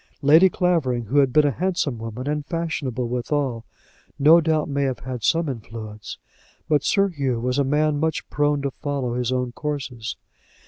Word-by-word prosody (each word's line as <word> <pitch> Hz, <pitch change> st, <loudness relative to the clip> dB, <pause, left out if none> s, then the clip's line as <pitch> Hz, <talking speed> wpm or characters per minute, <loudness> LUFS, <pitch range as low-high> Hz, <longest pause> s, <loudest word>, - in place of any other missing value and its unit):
Lady 160 Hz, +7 st, +7 dB
Clavering, 160 Hz, -11 st, 0 dB
who 130 Hz, +7 st, +1 dB
had 135 Hz, -2 st, +3 dB
been 150 Hz, +3 st, +4 dB
a 145 Hz, -, +3 dB
handsome 170 Hz, -5 st, -1 dB
woman 115 Hz, +4 st, -6 dB
and 150 Hz, 0 st, -1 dB
fashionable 145 Hz, -8 st, -2 dB
withal, 125 Hz, -1 st, -2 dB, 0.5 s
no 155 Hz, +4 st, +6 dB
doubt 155 Hz, -1 st, +1 dB
may 140 Hz, -1 st, -1 dB
have 135 Hz, -2 st, -1 dB
had 125 Hz, -1 st, -6 dB
some 165 Hz, +5 st, +2 dB
influence; 110 Hz, -4 st, -7 dB, 0.5 s
but 150 Hz, -2 st, +2 dB
Sir 200 Hz, -1 st, +2 dB
Hugh 135 Hz, -8 st, -2 dB
was 125 Hz, +3 st, -1 dB
a -, -, +4 dB
man 150 Hz, +2 st, +1 dB
much 160 Hz, +1 st, -1 dB
prone 145 Hz, -1 st, +1 dB
to 140 Hz, -, -1 dB
follow 135 Hz, -3 st, -3 dB
his 125 Hz, 0 st, -1 dB
own 125 Hz, -1 st, -1 dB
courses. 130 Hz, -5 st, -4 dB
140 Hz, 175 wpm, -23 LUFS, 125-150 Hz, 0.5 s, Lady